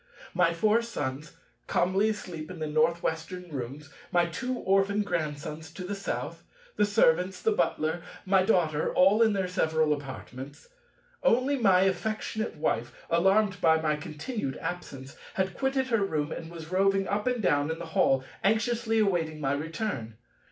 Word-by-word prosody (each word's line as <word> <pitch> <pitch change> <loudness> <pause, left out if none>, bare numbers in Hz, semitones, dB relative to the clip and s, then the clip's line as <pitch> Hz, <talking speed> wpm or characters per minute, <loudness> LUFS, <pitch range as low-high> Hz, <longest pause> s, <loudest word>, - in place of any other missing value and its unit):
My 165 - +3
four 210 +7 +3
Sons 145 - -4 0.3
calmly 190 +4 +2
asleep 175 -7 -5
in 185 - -7
the 155 - -3
North 155 +3 +1
Western 165 +2 -4
rooms, 140 +2 -6 0.2
my 175 -1 +4
two 250 +10 -3
orphan 195 +1 +2
Grandsons 155 -3 -4
to 185 - -7
the 190 +3 -4
South; 200 0 -4 0.3
the 210 - +3
Servants, 185 -2 +3
the 445 - +1
Butler, 160 - 0 0.2
my 190 0 +4
Daughter, 170 -6 +2
all 195 +5 +5
in 220 -2 +5
their 190 -2 0
several 160 -3 +2
apartments. 135 0 -8 0.5
Only 255 +4 +3
my 195 -8 +4
affectionate 215 +2 -1
Wife, 120 -6 -1 0.2
alarmed 195 +3 +3
by 160 0 +5
my 155 -1 +1
continued 155 - -5
absence, 140 -7 -6 0.2
had 190 0 0
quitted 265 -1 0
her 225 -4 +2
room 155 -5 -1
and 165 - -6
was 165 -1 -9
roving 195 +1 +2
up 210 +3 -1
and 250 -1 +1
down 145 -7 +2
in 160 - -2
the - - -6
Hall, 135 -4 +2 0.2
anxiously 225 +2 +1
awaiting 175 -7 +1
my 135 -2 0
return. 150 - -3
180 Hz, 160 wpm, -28 LUFS, 155-205 Hz, 0.5 s, all